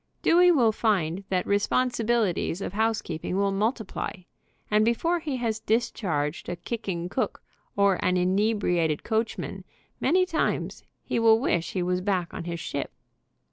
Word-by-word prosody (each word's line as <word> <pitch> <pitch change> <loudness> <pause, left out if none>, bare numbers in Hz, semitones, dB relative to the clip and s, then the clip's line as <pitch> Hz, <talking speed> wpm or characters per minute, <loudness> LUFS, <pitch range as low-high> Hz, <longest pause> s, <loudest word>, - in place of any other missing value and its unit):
Dewey 355 +1 +6
will 245 -9 +4
find 195 -5 0
that 185 -1 0
responsibili 230 0 +1
ties 170 - -3
of 195 - -5
housekeeping 210 -6 -1
will 200 0 +2
multiply, 220 +2 -2 0.6
and 210 +1 +4
before 330 +10 +1
he 295 -5 -3
has 225 -3 -1
discharged 175 -11 -1
a 175 - -2
kicking 175 -2 -4
cook 250 +8 -3 0.3
or 200 -2 +2
an 180 0 +2
inebriated 180 -4 +1
coachman, 225 +1 -2 0.4
many 365 +6 +3
times, 335 -4 -1 0.2
he - - -1
will 225 -1 +5
wish 175 -9 0
he 185 - 0
was 180 +1 0
back 185 -3 -1
on - - -6
his 170 -1 -4
ship. 140 -3 -4
205 Hz, 145 wpm, -26 LUFS, 180-230 Hz, 0.6 s, Dewey